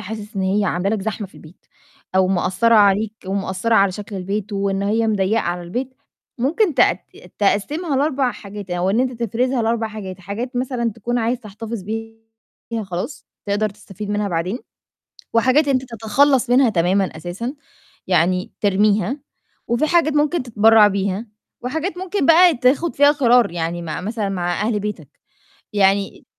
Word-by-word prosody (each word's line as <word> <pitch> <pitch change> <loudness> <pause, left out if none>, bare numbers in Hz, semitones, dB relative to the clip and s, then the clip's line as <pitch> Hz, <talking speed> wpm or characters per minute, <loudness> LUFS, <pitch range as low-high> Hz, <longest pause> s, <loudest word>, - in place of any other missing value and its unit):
حاسس 210 +1 -7
إن 190 - 0
هي 200 +2 +1
عاملة 180 +1 0
لك 195 - -5
زحمة 215 -1 -3
في 190 - -25
البيت 160 +3 -16 0.5
أو 190 -1 +4
مأثّرة 195 +5 +2
عليك 205 +1 +4
ومأثّرة 195 +3 -1
على 195 -3 +4
شكل 205 +1 -7
البيت 200 +3 -4
وإن 195 0 -1
هي 220 +3 +1
مضيَّقة 210 +1 +1
على 175 -1 -3
البيت 245 +9 -4 0.4
ممكن 320 - +1
تق - - +5
ت - - -15
تقسِّمها 275 - 0
ل4 270 -3 +1
حاجات 200 -2 -9
أو 175 +2 0
إن 220 +5 +2
أنت 250 -2 -2
تفرزها 245 +3 0
ل4 225 0 0
حاجات، 195 -3 -8
حاجات 230 +7 -5
مثلًا 245 -3 -1
تكون 240 +2 -2
عايز 235 +2 -1
تحتفظ 220 0 -7
بيها 225 +2 -8
خلاص 190 - -5 0.2
تقدر 205 +1 +1
تستفيد 210 0 -9
منها 205 0 0
بعدين 180 +6 -2 0.7
وحاجات 260 +6 +3
أنت 260 -1 +2
تتخلَّص 250 +4 +2
منها 250 -1 +5
تمامًا 185 +2 +2
أساسًا، 180 - -5 0.5
يعني 180 +1 +1
ترميها، 205 +5 +2 0.5
وفي 240 +6 +1
حاجات 330 -3 +3
ممكن 295 0 +1
تتبرّع 220 -2 +5
بيها 200 +2 -2 0.3
وحاجات 320 +8 -3
ممكن 375 -2 -2
بقى 335 +1 +6
تاخُد 270 +7 +2
فيها 285 +1 +6
قرار، 245 - +3
يعني 170 0 -3
مع 160 0 -5
مثلًا 210 0 -3
مع 175 -1 -2
أهل 210 -1 0
بيتك، 200 -8 -5 0.6
يعني 195 0 +1
215 Hz, 155 wpm, -20 LUFS, 195-245 Hz, 0.7 s, بقى